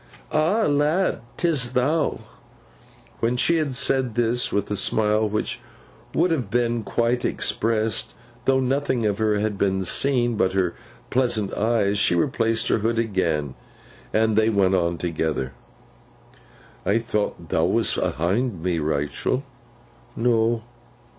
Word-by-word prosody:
'Ah, 175 Hz, +9 st, +2 dB
lad! 150 Hz, +5 st, +1 dB, 0.2 s
'Tis 145 Hz, -8 st, +1 dB
thou?' 145 Hz, +2 st, +1 dB, 1.0 s
When 120 Hz, +2 st, 0 dB
she 170 Hz, +6 st, +3 dB
had 150 Hz, -5 st, -1 dB
said 130 Hz, -3 st, +1 dB
this, 120 Hz, +1 st, +1 dB
with 100 Hz, 0 st, -1 dB
a -, -, 0 dB
smile 105 Hz, +2 st, +1 dB
which 105 Hz, +1 st, -2 dB, 0.6 s
would 170 Hz, +2 st, +2 dB
have 130 Hz, -11 st, -1 dB
been 120 Hz, 0 st, 0 dB
quite 120 Hz, +3 st, 0 dB
expressed, 110 Hz, -1 st, 0 dB, 0.3 s
though 135 Hz, 0 st, +3 dB
nothing 130 Hz, -2 st, 0 dB
of 105 Hz, -1 st, 0 dB
her 110 Hz, -1 st, +2 dB
had 105 Hz, -1 st, -2 dB
been 95 Hz, -1 st, +1 dB
seen 120 Hz, +4 st, +2 dB
but 95 Hz, -3 st, +1 dB
her 95 Hz, -3 st, +1 dB, 0.4 s
pleasant 120 Hz, -6 st, +1 dB
eyes, 105 Hz, -2 st, +1 dB
she 90 Hz, -, +3 dB
replaced 115 Hz, 0 st, +1 dB
her -, -, +2 dB
hood 115 Hz, +2 st, 0 dB
again, 85 Hz, -, -1 dB, 0.6 s
and 110 Hz, -1 st, +2 dB
they 110 Hz, +1 st, +3 dB
went 100 Hz, -3 st, +2 dB
on 85 Hz, -2 st, +1 dB
together. 80 Hz, -6 st, -2 dB, 1.3 s
'I 100 Hz, +4 st, +2 dB
thought 105 Hz, -2 st, -3 dB
thou -, -, +2 dB
wast -, -, +1 dB
ahind 95 Hz, -, -1 dB
me, 90 Hz, -2 st, 0 dB
Rachael?' 75 Hz, -, -1 dB, 0.7 s
'No. 115 Hz, -1 st, +1 dB
115 Hz, 135 wpm, -23 LUFS, 100-125 Hz, 1.3 s, she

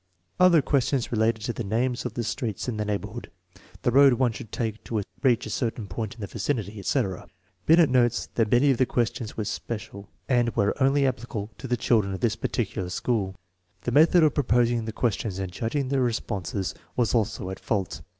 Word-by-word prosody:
Other 175 Hz, -5 st, +6 dB
questions 135 Hz, -2 st, +1 dB
related 110 Hz, -1 st, +1 dB
to 120 Hz, -, -2 dB
the 120 Hz, -, -4 dB
names 120 Hz, +4 st, -1 dB
of -, -, -4 dB
the 120 Hz, -, -1 dB
streets 115 Hz, -2 st, -3 dB
in 120 Hz, -3 st, -2 dB
the 105 Hz, -, -1 dB
neighborhood, 105 Hz, +2 st, -4 dB, 0.5 s
the 120 Hz, -, +2 dB
road 140 Hz, +1 st, +7 dB
one 120 Hz, 0 st, +2 dB
should 110 Hz, -1 st, -9 dB
take 110 Hz, -2 st, -3 dB
to 110 Hz, -3 st, -2 dB, 0.2 s
reach 125 Hz, -4 st, +3 dB
a -, -, -6 dB
certain 115 Hz, -3 st, -2 dB
point 100 Hz, +3 st, -5 dB
in 115 Hz, -, -12 dB
the -, -, -2 dB
vicinity, 110 Hz, -1 st, -3 dB
etc. 95 Hz, -1 st, -1 dB, 0.4 s
Binet 165 Hz, 0 st, +7 dB
notes 120 Hz, -2 st, +2 dB
I -, -, +1 dB
hat 110 Hz, -, +1 dB
many 135 Hz, +4 st, +5 dB
of 130 Hz, -, +1 dB
the 130 Hz, -, +3 dB
questions 120 Hz, -1 st, -2 dB
were 110 Hz, -, -2 dB
special, 100 Hz, -2 st, -6 dB, 0.2 s
and 120 Hz, -3 st, +2 dB
were 100 Hz, -, +2 dB
only 135 Hz, +1 st, +4 dB
applicable 115 Hz, -4 st, -3 dB
with 130 Hz, -, -6 dB
the 125 Hz, -, +1 dB
children 105 Hz, -4 st, +1 dB
of -, -, -7 dB
this 115 Hz, -2 st, +1 dB
particular 100 Hz, -5 st, -2 dB
school. 95 Hz, -1 st, -1 dB, 0.5 s
The 120 Hz, -, -2 dB
method 160 Hz, +5 st, +6 dB
of 155 Hz, -, +4 dB
proposing 120 Hz, -4 st, +2 dB
the 110 Hz, -, -3 dB
questions 110 Hz, -3 st, -1 dB
and 95 Hz, -2 st, -4 dB
judging 130 Hz, -, -2 dB
the 135 Hz, -1 st, +1 dB
responses 100 Hz, -5 st, -2 dB, 0.2 s
was 120 Hz, -3 st, +1 dB
also 110 Hz, -5 st, 0 dB
at 95 Hz, -, -7 dB
fault. 95 Hz, -7 st, -2 dB
115 Hz, 200 wpm, -26 LUFS, 105-125 Hz, 0.5 s, road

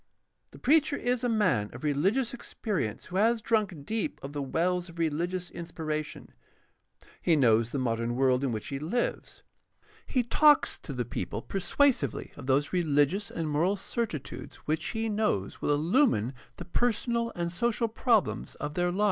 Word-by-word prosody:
The -, -, -14 dB
preacher 300 Hz, +1 st, +3 dB
is 245 Hz, -2 st, -1 dB
a 245 Hz, -, +1 dB
man 185 Hz, -, +2 dB
of -, -, -10 dB
reHgious 195 Hz, -, +1 dB
experi 210 Hz, -, -2 dB
ence 105 Hz, -, -12 dB
who 185 Hz, -, -4 dB
has 225 Hz, +3 st, +3 dB
drunk 210 Hz, -9 st, 0 dB
deep 225 Hz, -, -2 dB
of 140 Hz, +1 st, -6 dB
the 145 Hz, -, -3 dB
wells 175 Hz, +6 st, 0 dB
of 170 Hz, -, -13 dB
religious 170 Hz, +3 st, -1 dB
inspiration; 155 Hz, -3 st, -5 dB, 0.9 s
he 170 Hz, -, +3 dB
knows 115 Hz, -4 st, +3 dB
the -, -, -2 dB
modern 115 Hz, -2 st, -1 dB
world 130 Hz, 0 st, +3 dB
in 135 Hz, -, 0 dB
which 110 Hz, -2 st, -4 dB
he 135 Hz, -1 st, -3 dB
lives; 180 Hz, -, -2 dB, 0.6 s
he 255 Hz, -, +1 dB
talks 295 Hz, +5 st, +4 dB
to 140 Hz, -, -7 dB
the 125 Hz, -2 st, -2 dB
people 105 Hz, -1 st, -4 dB
persuasively 195 Hz, -, +1 dB
of -, -, -9 dB
those 140 Hz, +4 st, +2 dB
religious 165 Hz, +3 st, +2 dB
and 165 Hz, -2 st, -3 dB
moral 160 Hz, +7 st, +2 dB
certitudes 200 Hz, -, -4 dB
which 155 Hz, +1 st, -1 dB
he 225 Hz, 0 st, -2 dB
knows 210 Hz, -, -1 dB
will -, -, -1 dB
illumine 150 Hz, -, +2 dB, 0.2 s
the -, -, -7 dB
personal 235 Hz, +2 st, 0 dB
and 170 Hz, -1 st, -2 dB
social 235 Hz, +5 st, 0 dB
prob 225 Hz, -1 st, +3 dB
lems -, -, -6 dB
of 150 Hz, -, -5 dB
their 175 Hz, +2 st, +1 dB
lives. 180 Hz, +3 st, -3 dB
175 Hz, 170 wpm, -29 LUFS, 140-225 Hz, 0.9 s, talks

